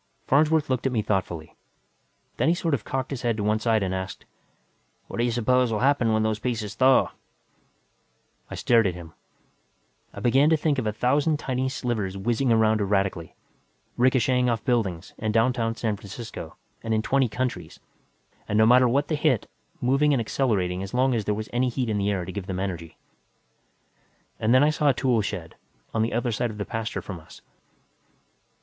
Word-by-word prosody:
Farnsworth 155 +2 +3
looked 130 0 0
at - - -1
me 110 -4 0
thoughtfully. 90 -6 -3 0.8
Then - - +2
he 170 - +3
sort 165 -2 -1
of 120 -7 -1
cocked 130 +3 -3
his 135 -3 -4
head 115 -3 0
to 105 - -2
one 105 +1 +1
side 110 -2 +1
and 95 -1 -2
asked, 95 0 -5 0.8
"What - - -8
do 120 - +1
you 120 - +1
suppose 120 +1 +2
will 105 - -1
happen 135 -4 +3
when 110 0 +2
those 110 -1 0
pieces 110 -4 -3
thaw?" 130 +4 +4 1.4
I - - -6
stared 115 -3 +3
at 90 - -2
him. 85 -2 -10 1.0
I - - -9
began 135 +5 +4
to 160 - +4
think 150 -2 0
of 115 - -2
a - - +1
thousand 140 +7 +1
tiny 130 -1 -2
slivers 110 -7 -3
whizzing 120 +5 0
around 110 -1 +3
erratically, 95 -4 -1 0.6
richocheting 125 0 +2
off 115 -2 -3
buildings, 110 -10 -1
in 110 0 -1
downtown 115 0 +1
San 110 -2 -1
Francisco 100 -4 -8 0.3
and 115 -1 -1
in 110 - 0
twenty 135 -1 +2
counties, 125 +3 -4 0.7
and 105 - 0
no 110 - +6
matter 125 +2 +6
what 140 +4 +1
they 155 - 0
hit, 145 -6 +1 0.3
moving 140 +4 +3
and - - +1
accelerating 100 -7 0
as 95 +4 -6
long 130 +1 +3
as 110 -4 -1
there 105 - 0
was 110 +1 -5
any 125 +1 +1
heat 125 -1 -2
in 105 - 0
the 100 +1 0
air 95 -3 -1
to 95 - -6
give 95 -1 -6
them 95 -1 -3
energy. 85 -4 -5 1.4
And 110 - +1
then 130 +2 +6
I 150 - +4
saw 150 -1 +2
a 135 - +2
tool 125 -4 +2
shed, 100 - -5 0.4
on 110 - +1
the 115 - 0
other 120 +1 0
side 115 +2 -1
of 105 - -8
the 100 - -3
pasture 115 0 -4
from 95 -4 -7
us. 80 - -16
115 Hz, 195 wpm, -25 LUFS, 105-130 Hz, 1.4 s, no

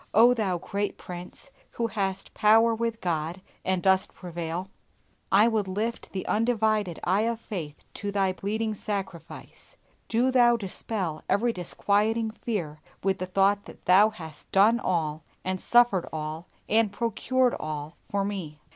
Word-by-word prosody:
O 235 +3 +7
Thou 200 -7 0
great 200 +4 -3
Prince, 180 +9 -9 0.2
who 235 - -1
hast 195 -4 -3
power 225 +2 +5
with 230 0 -2
God 165 0 -2 0.2
and 185 -2 0
dost 190 0 +2
prevail, 175 0 -5 0.6
I 205 +4 +6
would 220 -4 0
lift 215 +5 -3
the 190 - -4
undivided 215 -5 +1
eye 200 +5 +2
of 230 -1 -3
faith 165 -10 -6 0.2
to 205 -1 -4
Thy 195 -2 +1
bleeding 215 +3 -2
sacrifice! 195 -5 -6 0.3
Do 240 +3 +2
Thou 240 -2 +5
dispel 190 -5 -4
every 230 +3 +2
disquieting 210 +5 0
fear 175 -10 -4 0.2
with 190 0 +1
the 185 - -3
thought 195 +2 +2
that - - -14
Thou 195 +4 +6
hast 160 -8 -10
done 215 +5 +5
all, 160 -6 -1 0.2
and 185 0 -2
suffered 240 -7 +4
all, 155 +2 -5 0.2
and 220 -1 +3
procured 250 +2 +1
all 155 +1 -5
for 200 -1 0
me. 180 -7 -5
200 Hz, 145 wpm, -27 LUFS, 180-225 Hz, 0.6 s, O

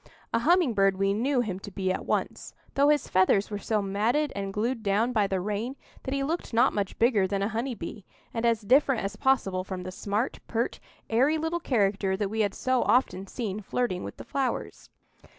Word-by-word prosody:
A - - +3
humming 330 0 +3
bird 195 -2 +3
we 195 0 +2
knew 250 +5 +1
him 195 -6 -3
to 205 - -8
be 190 -1 -1
at - - -4
once, - - -2 0.2
though 280 +1 +4
his 295 -1 +2
feathers 190 +2 +3
were 205 - -3
so 210 0 0
matted 225 +10 0
and 195 -1 -3
glued 230 +4 -1
down 215 +4 +1
by 210 -4 +2
the 190 -1 -1
rain 210 +7 -3 0.3
that 265 - -4
he 275 - 0
looked 310 -4 -3
not 245 +3 +4
much 200 -2 -2
bigger 225 -5 +3
than 195 +1 -1
a - - +1
honey 235 +3 -2
bee, 200 +2 -7 0.3
and 230 - -2
as 230 -2 +2
different 260 +3 +3
as 200 +2 -3
possible 205 -7 +1
from 185 -1 -6
the 185 - -6
smart, 205 +6 -2
pert, 235 +1 -1 0.3
airy 265 +8 +3
little 325 +2 -1
character 200 - +1
that 200 -1 -2
we 220 - -3
had 205 -2 +1
so 255 -1 +1
often 195 -6 +2
seen 210 -2 -4
flirting 195 -3 -2
with - - -7
the - - -8
flowers. 270 -2 -3
215 Hz, 210 wpm, -27 LUFS, 195-255 Hz, 0.3 s, though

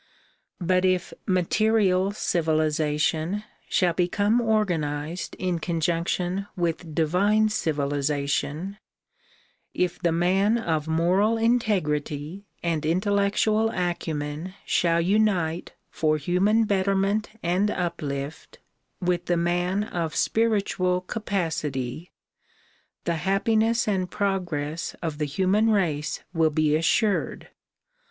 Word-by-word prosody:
But 185 +1 +2
if 185 -1 +1
material 190 +1 +2
civilization 155 +1 0 0.3
shall 180 -3 +2
become 205 +6 +2
organized 175 -7 -1
in 180 -2 -1
conjunction 175 +3 -1
with 165 -2 -2
divine 200 +7 +3
civilization, 145 +2 -1 1.0
if 180 -1 0
the 175 -2 +1
man 190 +6 +2
of 160 -8 -1
moral 180 +8 +2
integrity 190 -7 0 0.2
and 165 -3 0
intellectual 200 +5 +2
acumen 165 -2 -3
shall 170 -1 +2
unite 180 -3 +1 0.2
for 155 -1 +1
human 190 +9 +2
betterment 200 +1 +1
and 180 +4 +1
uplift 155 -6 -4 0.4
with 175 -1 0
the 175 - +2
man 175 +3 0
of 170 -6 -3
spiritual 200 -5 +1
capacity, 165 - -3 0.9
the 170 -1 -1
hap 195 +4 0
piness 225 +1 +2
and 185 -3 0
progress 170 -6 -2
of 160 -3 -3
the 150 - +1
human 190 +9 +2
race 160 -9 0
will 160 -2 +3
be 155 0 +2
assured. 200 +6 +1
180 Hz, 100 wpm, -25 LUFS, 160-200 Hz, 1.0 s, divine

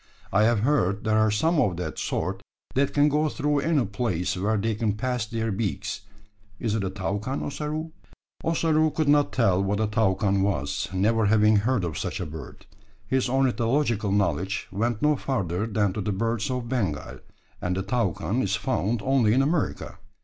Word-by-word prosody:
I 100 +2 +4
have 115 -2 +2
heard 105 -7 +1
there 110 -1 +2
are 110 0 +4
some 160 +9 +2
of 90 -9 0
that 90 -3 -4
sort - - -2 0.3
that 135 +1 +1
can 145 0 +4
go 150 +1 +2
through 145 0 0
any 145 -2 +1
place 100 -4 -1
where 105 +4 0
they 110 +2 0
can 105 0 0
pass 125 +1 -2
their 115 0 -2
beaks. 95 -5 -3 0.6
Is 115 -3 -1
it 110 -2 0
a 95 - -1
toucan, 100 +6 -3
Ossaroo?" 155 +2 -4 0.5
Ossaroo 160 -1 +2
could 155 0 -1
not 145 0 +4
tell 100 -6 +2
what 100 +1 0
a 110 - +2
toucan 100 -2 +1
was, 95 -8 -1
never 105 +3 +2
having 105 0 +5
heard 115 +1 +1
of 80 -5 -3
such - - -3
a - - -3
bird. 80 +1 -9 0.4
His 130 +3 0
ornithological 120 -4 +1
knowledge 95 -1 0
went 115 +3 -1
no 150 0 +4
further 105 -7 -2
than 105 -3 0
to 105 - -3
the 105 - -1
birds 115 +3 -1
of 125 -2 -3
Bengal; 100 - -2 0.4
and 90 +1 -1
the 95 - -1
toucan 100 -2 -1
is - - 0
found 105 +7 -1
only 130 -5 +3
in 135 - +4
America. 145 - -2
110 Hz, 180 wpm, -26 LUFS, 100-130 Hz, 0.6 s, having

